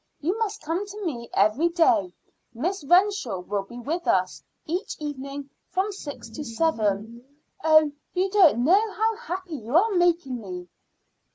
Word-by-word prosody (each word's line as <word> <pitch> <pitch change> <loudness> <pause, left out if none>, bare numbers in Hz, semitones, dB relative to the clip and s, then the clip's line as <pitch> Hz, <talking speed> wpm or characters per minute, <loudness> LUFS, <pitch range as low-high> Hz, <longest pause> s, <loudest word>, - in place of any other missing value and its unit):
You 345 +7 0
must 425 -2 -2
come 330 +6 -1
to 410 0 -7
me 240 -8 -4
every 215 - +3
day; 235 - +3 0.4
Miss 345 - -2
Renshaw 350 - +2
will 200 +2 -2
be 220 +5 -11
with 320 +8 -3
us 185 -1 +1 0.2
each 355 +6 -3
evening 280 -1 -6 0.2
from 385 +3 0
six 295 - -8
to 225 +7 -7
seven. 225 -4 -1 0.4
Oh! 310 -1 +5 0.2
you 375 +1 +1
don't 340 - +5
know 400 - +4
how 445 +1 +1
happy 370 -8 -5
you 235 +3 -5
are 440 +5 +4
making 345 - +1
me." 180 -3 -7
310 Hz, 155 wpm, -25 LUFS, 235-370 Hz, 0.4 s, Oh